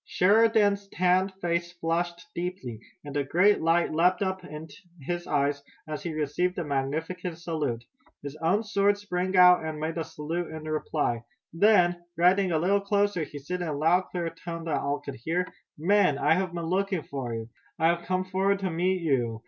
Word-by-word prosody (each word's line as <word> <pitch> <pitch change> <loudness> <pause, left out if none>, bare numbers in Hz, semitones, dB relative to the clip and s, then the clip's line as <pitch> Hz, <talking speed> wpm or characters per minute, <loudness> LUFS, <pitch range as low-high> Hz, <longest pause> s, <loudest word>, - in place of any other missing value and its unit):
Sheridan's 205 0 +3
tanned 185 +1 +2
face 170 0 -1
flushed 170 0 -2
deeply, 170 - -5 0.3
and 145 -1 -7
a 145 - +1
great 180 +9 +3
light 165 +1 +2
leaped 180 +5 +3
up 190 -1 -2
in 155 -2 -8 0.3
his 175 +5 -4
eyes, 145 -1 +1 0.3
as 155 -1 -4
he 170 - -4
received 155 +4 -1
the 175 - -2
magnificent 160 +5 -3
salute. 155 -9 -3 0.4
His 140 0 -6
own 170 +7 +1
sword 205 -1 +2
sprang 185 -2 -2
out, 180 -2 +7
and 155 -1 -4
made 160 +2 -2
the 165 - -3
salute 165 +3 -4
in 160 0 -7
reply. 155 -6 -1 0.3
Then, 175 -2 +4
riding 180 +2 +4
a 160 - +2
little 195 +5 +2
closer, 200 -2 +1
he 150 -1 -6
said 180 +6 -4
in 175 - -2
a 155 - -2
loud, 170 +5 +3
clear 170 -2 -3
tone 165 0 -7
that 165 -2 -1
all 140 +1 -2
could 140 - -7
hear: 175 +4 0 0.3
"Men, 175 -2 +3
I 160 - +3
have 185 +1 0
been 170 -1 -4
looking 190 0 0
for 130 -4 -5
you! 115 0 -6 0.3
I 160 - +3
have 170 0 -1
come 185 0 0
forward 190 +1 +1
to 190 -2 -1
meet 180 +2 0
you! 120 -7 0
170 Hz, 190 wpm, -27 LUFS, 155-185 Hz, 0.4 s, out